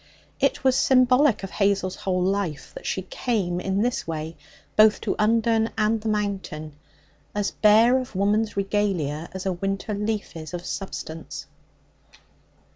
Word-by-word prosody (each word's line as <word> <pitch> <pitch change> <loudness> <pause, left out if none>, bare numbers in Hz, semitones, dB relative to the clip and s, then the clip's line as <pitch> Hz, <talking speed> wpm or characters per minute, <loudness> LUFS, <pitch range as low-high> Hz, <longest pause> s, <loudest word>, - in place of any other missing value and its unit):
It - - +1
was 260 -1 +4
symbolic 255 -2 +4
of 195 - -5
Hazel's 195 -2 +1
whole 185 -1 -1
life 190 -5 -2
that - - -8
she - - -2
came 210 - -1
in 195 +3 0
this 245 -6 -1
way 160 0 -4 0.4
both 215 0 +6
to - - -1
Undern 225 +1 +2
and 215 0 +1
the 220 - -2
Mountain 195 -7 -3 0.6
as 205 -1 0
bare 225 +4 +5
of 250 -5 -7
woman's 205 +2 +1
regalia 190 -6 -1
as 190 0 -6
a 190 - +1
winter 195 +3 -3
leaf 210 -1 -3
is 160 +1 -6
of 175 0 -7
substance. 165 -4 -6
200 Hz, 145 wpm, -24 LUFS, 185-220 Hz, 0.6 s, both